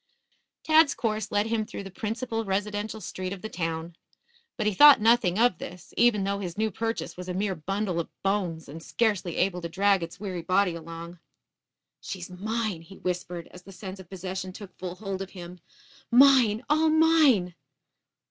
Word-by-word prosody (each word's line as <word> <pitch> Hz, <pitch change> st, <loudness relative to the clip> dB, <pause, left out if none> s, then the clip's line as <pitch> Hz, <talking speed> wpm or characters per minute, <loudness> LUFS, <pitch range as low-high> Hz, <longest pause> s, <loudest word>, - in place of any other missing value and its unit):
Tad's 315 Hz, -1 st, +5 dB
course 215 Hz, -3 st, -2 dB
led 205 Hz, 0 st, +2 dB
him 225 Hz, -1 st, 0 dB
through 210 Hz, -, -7 dB
the 195 Hz, -, -9 dB
principal 225 Hz, +1 st, -3 dB
residential 205 Hz, +2 st, -2 dB
street 185 Hz, 0 st, -5 dB
of 190 Hz, -, -10 dB
the 220 Hz, -, -4 dB
town. 165 Hz, -1 st, -4 dB, 0.6 s
But 215 Hz, -, -1 dB
he 210 Hz, -, +2 dB
thought 290 Hz, +9 st, +9 dB
nothing 220 Hz, -5 st, +3 dB
of 230 Hz, -6 st, +3 dB
this, 180 Hz, -1 st, -9 dB
even 230 Hz, -4 st, +4 dB
though 200 Hz, +1 st, -1 dB
his 180 Hz, -3 st, -5 dB
new 220 Hz, 0 st, 0 dB
purchase 225 Hz, +4 st, -3 dB
was 180 Hz, 0 st, -7 dB
a 180 Hz, -, -3 dB
mere 195 Hz, +1 st, 0 dB
bundle 185 Hz, +2 st, -2 dB
of 170 Hz, -, -3 dB
bones 185 Hz, -5 st, -1 dB
and 155 Hz, +4 st, -9 dB
scarcely 195 Hz, -3 st, 0 dB
able 180 Hz, -1 st, +1 dB
to 170 Hz, -, -5 dB
drag 195 Hz, +2 st, +2 dB
its 170 Hz, +1 st, -7 dB
weary 190 Hz, -4 st, -4 dB
body 185 Hz, +1 st, +2 dB
along. 165 Hz, +1 st, -8 dB, 0.8 s
"She's 185 Hz, -1 st, -7 dB
mine," 215 Hz, -1 st, -3 dB
he 190 Hz, +4 st, -14 dB
whispered, 180 Hz, -1 st, -4 dB
as 180 Hz, -, -12 dB
the 195 Hz, -, -13 dB
sense 190 Hz, 0 st, -8 dB
of 180 Hz, -2 st, -12 dB
possession 185 Hz, 0 st, -5 dB
took 195 Hz, -2 st, -11 dB
full 180 Hz, -1 st, -5 dB
hold 195 Hz, -1 st, -5 dB
of 195 Hz, -, -5 dB
him. 175 Hz, 0 st, -9 dB, 0.5 s
"Mine, 245 Hz, -3 st, +6 dB
all 310 Hz, +2 st, +3 dB
mine!" 310 Hz, -, +4 dB
195 Hz, 180 wpm, -27 LUFS, 180-220 Hz, 0.8 s, thought